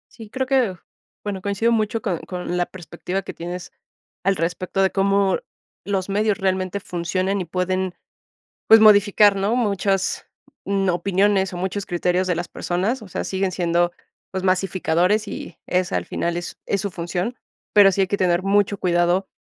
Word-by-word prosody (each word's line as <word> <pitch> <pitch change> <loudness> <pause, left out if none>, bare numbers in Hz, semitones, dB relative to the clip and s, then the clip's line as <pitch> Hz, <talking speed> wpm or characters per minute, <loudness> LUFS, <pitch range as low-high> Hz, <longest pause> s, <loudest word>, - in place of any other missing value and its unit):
Sí, 225 -3 -11
creo 260 +4 -2
que 255 -7 +2 0.5
bueno, 200 -2 -4
coincido 205 +4 0
mucho 220 0 0
con 185 -8 -1
con 180 -1 -5
la 175 0 0
perspectiva 185 +1 -5
que - - -7
tienes 175 +1 -7 0.5
al 195 +1 +2
respecto 180 +3 -1
de 190 - +2
cómo 195 -1 +2 0.5
los 195 -2 -1
medios 210 +1 +1
realmente 190 0 -1
funcionan 185 +2 -2
y - - -4
pueden 185 +1 -1 0.7
pues, 225 0 +9
modificar, 205 -1 +6
¿no?, 200 +5 +1
muchas 200 -4 0 0.4
n 195 -1 0
opiniones 190 +2 +1
o - - -5
muchos 190 +2 -3
criterios 180 0 0
de 180 - +1
las 175 - -3
personas, 200 +8 -2
o 210 - -10
sea, - - -3
siguen 190 -1 -1
siendo, 175 -1 +1 0.4
pues, 190 -1 -3
masificadores 185 +2 +1
y - - -7
esa, 180 0 0
al - - -1
final, 170 0 -2
es 175 - -5
es 200 - 0
su 200 0 -3
función. 175 +8 -3 0.4
Pero 205 -2 +8
sí 195 - +1
hay - - +2
que 200 - -1
tener 180 -2 +2
mucho 200 0 +2
cuidado 175 0 +1
190 Hz, 170 wpm, -22 LUFS, 180-200 Hz, 0.7 s, pues